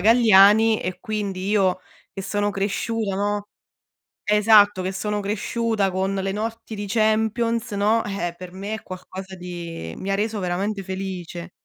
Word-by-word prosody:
Galliani 220 -1 +6
e 180 0 -4
quindi 200 -4 -3
io 190 -3 +2 0.3
che 195 - -6
sono 205 +1 0
cresciuta, 200 +1 -2
no 205 0 -1 0.8
esatto, 210 -2 +5
che 190 - -1
sono 210 +2 -2
cresciuta 210 0 -1
con 190 +1 -1
le 195 0 -1
notti 225 +2 -4
di 205 0 -4
Champions, 225 +2 +1
no, 210 +3 +2
eh, 175 -4 -3
per 185 -1 -9
me 200 +3 -4
è 220 - -10
qualcosa 190 +1 -8
di 170 - -7
mi 195 - -3
ha 195 - +2
reso 215 +1 -1
veramente 195 +2 -2
felice. 180 -2 -6
200 Hz, 150 wpm, -23 LUFS, 190-215 Hz, 0.8 s, Galliani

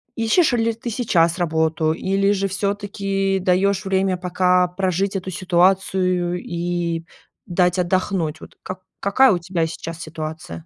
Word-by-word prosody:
ищешь 235 +8 +3
ли 230 -1 +1
ты 230 +2 -6
сейчас 180 -7 +1
работу, 160 -1 +1
или 195 +3 +1
же 195 -1 0
всё-таки 195 -1 -1
даёшь 190 +2 +1
время 190 -1 +1
пока 180 0 +2
прожить 190 +2 -1
эту 190 0 -3
ситуацию, 185 -1 +1
и 170 -1 -2 0.4
дать 180 +1 +1
отдохнуть? 175 -3 -1
Вот - - -13
как 185 0 -6 0.2
какая 255 +6 +4
у 180 - +1
тебя 170 -1 -1
сейчас 165 0 -6
ситуация? 155 - -7
185 Hz, 135 wpm, -21 LUFS, 170-195 Hz, 0.4 s, какая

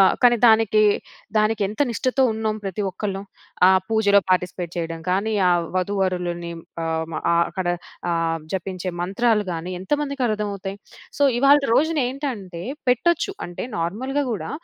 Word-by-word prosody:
ఆహ్, 190 - +6
కానీ 240 -1 +6
దానికి, 220 -2 +5 0.5
దానికి 215 0 +2
ఎంత 210 +5 -8
నిష్టతో 255 +3 0
ఉన్నాం 220 -1 -2
ప్రతి 195 +1 -3
ఒక్కళ్ళం. 195 +1 -4 0.4
ఆ - - +8 0.2
పూజలో 220 -2 +4
పార్టిసిపేట్ 180 -1 0
చేయడం 165 -1 -3
కాని, 200 +4 +1 0.2
ఆ - - +4 0.3
వధూవరులని 180 -3 -1 0.3
ఆహ్, 160 0 -1
మ - - -5 0.4
అక్కడ 185 -2 -4 0.4
ఆహ్, 165 -1 0
జపించే 185 -1 -3
మంత్రాలు 210 +4 +1
గాని 170 +2 -4
ఎంతమందికి 280 +5 -1
అర్థమవుతాయి. 200 -2 -3 0.4
సో, 285 - +2 0.2
ఇవాల్టి 275 +2 +5
రోజున 315 +1 +2
ఏంటంటే 220 - -5 0.3
పెట్టొచ్చు. 340 - +2
అంటే 175 - -6
నార్మల్‌గా 260 +12 -1
కూడా 210 - -4
200 Hz, 135 wpm, -22 LUFS, 180-240 Hz, 0.5 s, ఆ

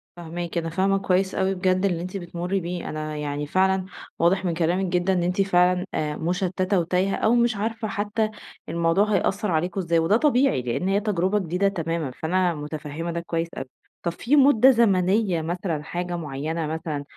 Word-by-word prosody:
فاهماكِ، 170 0 -5
أنا 165 -1 -1
فاهمة 195 +4 +1
كويس 190 0 +1
أوي 190 0 +1
بجد 185 +1 +1
اللي 175 -4 0
أنتِ 185 +3 -5
بتمُرّي 175 +1 -3
بيه 175 0 -5
أنا 155 0 -4
يعني 145 0 -3
فعلًا 190 +3 +2 0.3
واضح 185 +3 +2
من 170 - 0
كلامِك 175 +3 0
جدًا 180 +1 +1
إن 180 - +1
أنتِ 180 +3 +1
فعلًا 180 -1 +3
آآ 150 -1 -1
مُشتتة 185 +3 0
وتايهة 180 +3 0
أو 225 +2 +2
مش 235 -1 +2
عارفة 225 +2 -3
حتى 210 +2 -1 0.4
الموضوع 170 +6 +2
هيأثر 195 +1 0
عليكم 175 +5 -1
إزاي، 170 -2 +1
وده 165 +7 +3
طبيعي 270 - +2
لأن 125 +9 -2
هي 195 +1 +2
تجربة 205 -1 0
جديدة 180 +2 0
تمامًا، 165 -6 -2
فأنا 175 +6 0
متفهمة 150 +2 -5
ده 170 - -2
كويس 170 0 -2
أوي. 135 - -4 0.4
طب 170 - 0
في 235 +11 0
مدة 270 -3 +6
زمنية 195 -4 +2
مثلًا 165 -2 -3
حاجة 175 +2 -4
معينة 155 +1 -3
مثلًا، 155 -2 -4
180 Hz, 180 wpm, -24 LUFS, 165-195 Hz, 0.4 s, مدة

